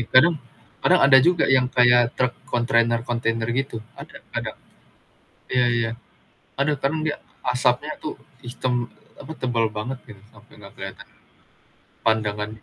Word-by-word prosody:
Ih, 120 Hz, -, -4 dB
kadang, 155 Hz, +4 st, +5 dB, 0.4 s
kadang 180 Hz, 0 st, +4 dB
ada 135 Hz, -1 st, +8 dB
juga 175 Hz, +6 st, +3 dB
yang 125 Hz, -1 st, +2 dB
kayak 120 Hz, -1 st, +4 dB
truk 125 Hz, -1 st, +1 dB, 0.2 s
kontainer-kontainer 115 Hz, -1 st, +1 dB, 0.2 s
gitu, 135 Hz, -3 st, -6 dB, 0.2 s
ada -, -, -12 dB
ada, -, -, -3 dB, 1.0 s
iya 125 Hz, -1 st, +2 dB
iya, 115 Hz, -1 st, 0 dB, 0.7 s
ada 140 Hz, +2 st, +2 dB
kan 150 Hz, +4 st, 0 dB
dia 150 Hz, -, -1 dB, 0.3 s
asapnya 125 Hz, +3 st, +1 dB
tuh 155 Hz, -, -5 dB, 0.2 s
hitam, 125 Hz, 0 st, -2 dB, 0.2 s
apa, 160 Hz, -, -9 dB
tebal 120 Hz, -3 st, +1 dB
banget 120 Hz, +5 st, -5 dB
gitu 105 Hz, -, -12 dB, 0.2 s
sampe 105 Hz, +2 st, -19 dB
nggak 100 Hz, -1 st, -13 dB
kelihatan, 95 Hz, 0 st, -8 dB, 1.0 s
pandangan. 105 Hz, -1 st, 0 dB
120 Hz, 135 wpm, -23 LUFS, 115-135 Hz, 1.0 s, ada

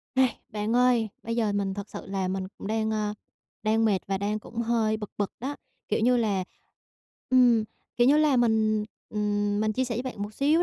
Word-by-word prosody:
Này, 260 Hz, -2 st, +3 dB
bạn 210 Hz, +1 st, -2 dB
ơi, 245 Hz, -3 st, +4 dB
bây 230 Hz, +1 st, -3 dB
giờ 220 Hz, -3 st, +1 dB
mình 200 Hz, -1 st, -1 dB
thật 200 Hz, 0 st, -6 dB
sự -, -, -8 dB
là 195 Hz, -1 st, -2 dB
mình 190 Hz, 0 st, -2 dB
cũng -, -, -7 dB
đang, 220 Hz, +1 st, 0 dB
ơ, 210 Hz, -1 st, -1 dB, 0.5 s
đang 220 Hz, +1 st, +2 dB
mệt 205 Hz, -4 st, +3 dB
và 195 Hz, -1 st, -1 dB
đang 205 Hz, +2 st, -1 dB
cũng 225 Hz, -, -14 dB
hơi 225 Hz, -2 st, +1 dB
bực 210 Hz, -2 st, -7 dB
bực 205 Hz, -, -1 dB
đó. 275 Hz, +4 st, -3 dB, 0.3 s
Kiểu -, -, +1 dB
như 245 Hz, +3 st, +4 dB
là, 205 Hz, -5 st, +1 dB, 0.9 s
ừm, 245 Hz, -4 st, +5 dB, 0.3 s
kiểu 240 Hz, -, +4 dB
như 285 Hz, +3 st, +6 dB
là, 305 Hz, -3 st, +4 dB
mình, 220 Hz, -3 st, +2 dB, 0.2 s
ừm, 205 Hz, -1 st, 0 dB
mình 215 Hz, 0 st, +1 dB
chia 260 Hz, +4 st, 0 dB
sẻ 245 Hz, -2 st, -3 dB
với 240 Hz, -, -2 dB
bạn 255 Hz, -6 st, -5 dB
một 210 Hz, +1 st, -6 dB
xíu 300 Hz, +7 st, +3 dB
220 Hz, 215 wpm, -27 LUFS, 205-240 Hz, 0.9 s, như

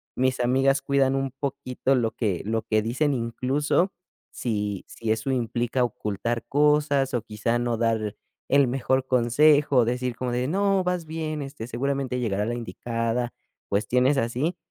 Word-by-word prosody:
mis 130 Hz, 0 st, +1 dB
amigas 135 Hz, +3 st, +3 dB
cuidan 135 Hz, -1 st, +2 dB
un 135 Hz, -1 st, -1 dB
poquito 135 Hz, -1 st, -1 dB
lo 115 Hz, -3 st, +1 dB
que 100 Hz, -7 st, -1 dB
lo 110 Hz, +1 st, 0 dB
que 110 Hz, -1 st, +1 dB
dicen, 130 Hz, +7 st, 0 dB
incluso 135 Hz, +9 st, 0 dB, 0.4 s
si 105 Hz, -4 st, -2 dB
si 110 Hz, -1 st, -3 dB
eso 110 Hz, +4 st, 0 dB
implica 120 Hz, 0 st, 0 dB
ocultar 110 Hz, +1 st, -3 dB
cosas 145 Hz, -1 st, +2 dB
o 120 Hz, -, +1 dB
quizá 110 Hz, +2 st, -1 dB
no 120 Hz, -1 st, -1 dB
dar 110 Hz, -2 st, 0 dB, 0.3 s
el 140 Hz, -1 st, +5 dB
mejor 130 Hz, +1 st, 0 dB
consejo 140 Hz, +4 st, +4 dB
o 120 Hz, -, +6 dB
decir 125 Hz, 0 st, -1 dB
como 125 Hz, -1 st, -2 dB
de: 125 Hz, +1 st, 0 dB
"No, 195 Hz, +1 st, +2 dB
vas 180 Hz, -2 st, -1 dB
bien, 155 Hz, -1 st, -4 dB
este, 135 Hz, -4 st, -6 dB
seguramente 130 Hz, +1 st, -2 dB
llegará 105 Hz, -4 st, 0 dB
la 120 Hz, +2 st, -2 dB
indicada", 120 Hz, 0 st, -2 dB, 0.4 s
cuestiones 125 Hz, +7 st, +2 dB
así 125 Hz, +8 st, -1 dB
125 Hz, 155 wpm, -25 LUFS, 115-140 Hz, 0.4 s, o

